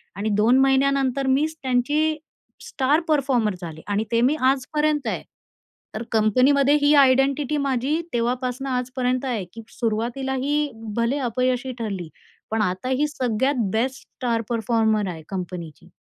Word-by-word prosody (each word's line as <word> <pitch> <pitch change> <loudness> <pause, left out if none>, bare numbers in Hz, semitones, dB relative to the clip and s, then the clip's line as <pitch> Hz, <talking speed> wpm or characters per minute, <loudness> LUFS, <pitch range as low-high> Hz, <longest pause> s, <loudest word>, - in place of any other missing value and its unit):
आणि 205 +2 -2
2 235 +5 +4
महिन्यानंतर 270 0 +2
मीच 295 +4 +1
त्यांची 290 +5 +1 0.5
स्टार 285 +4 +2
परफॉर्मर 260 -9 +1
झाले 160 -2 -7
आणि 205 +1 0
ते 230 0 +2
मी 270 +5 +3
आजपर्यंत 295 0 0
आहे. - - -2 0.7
तर 220 - -3
कंपनीमध्ये 260 +6 +4
ही 290 +1 +4
आयडेंटिटी 275 +2 +3
माझी 275 +2 0
तेव्हापासून 250 +2 -1
आजपर्यंत 255 0 -1
आहे, 230 -8 -2
की 225 - -8 0.2
सुरुवातीला 240 +4 -1
ही 295 +1 0 0.3
भले 235 +5 +1
अपयशी 255 +2 -1
ठरली, 195 -7 -4 0.4
पण 220 -1 +1
आता 185 +5 -1
ही 275 +3 +1
सगळ्यात 250 -4 0
बेस्ट 255 +4 -1
स्टार 235 -3 -3
परफॉर्मर 225 -3 +1
आहे 160 -3 -7
कंपनीची. 180 -5 -6
255 Hz, 135 wpm, -23 LUFS, 225-275 Hz, 0.7 s, 2